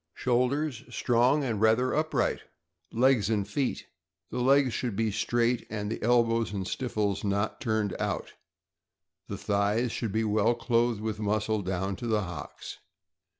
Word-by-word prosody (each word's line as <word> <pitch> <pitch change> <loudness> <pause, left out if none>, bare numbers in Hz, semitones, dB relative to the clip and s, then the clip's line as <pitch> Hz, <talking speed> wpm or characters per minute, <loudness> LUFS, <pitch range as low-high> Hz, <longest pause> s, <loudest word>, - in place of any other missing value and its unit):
Shoulders 125 +1 0
strong 125 +4 +2
and 115 -6 -2
rather 115 +3 +3
upright. 155 +1 0 0.5
Legs 120 -3 +3
and 105 -3 0
feet. 130 +5 -2 0.2
— - - -58
The 125 - -3
legs 135 0 +4
should 120 -1 -2
be 110 +1 0
straight, 120 +3 0
and 105 -1 -3
the - - -4
elbows 115 -1 +2
and 95 -3 -3
stifles 105 -6 -2
not 100 +1 -1
turned 110 -3 0
out. - - -3 0.9
The - - -5
thighs 105 +4 0
should 115 -3 -3
be 110 +2 0
well 110 +2 +2
clothed 115 -2 +1
with 110 -1 -3
muscle 105 0 0
down 95 +1 -2
to 120 - -5
the 110 -2 +1
hocks. 90 -6 -8
110 Hz, 150 wpm, -28 LUFS, 105-120 Hz, 0.9 s, legs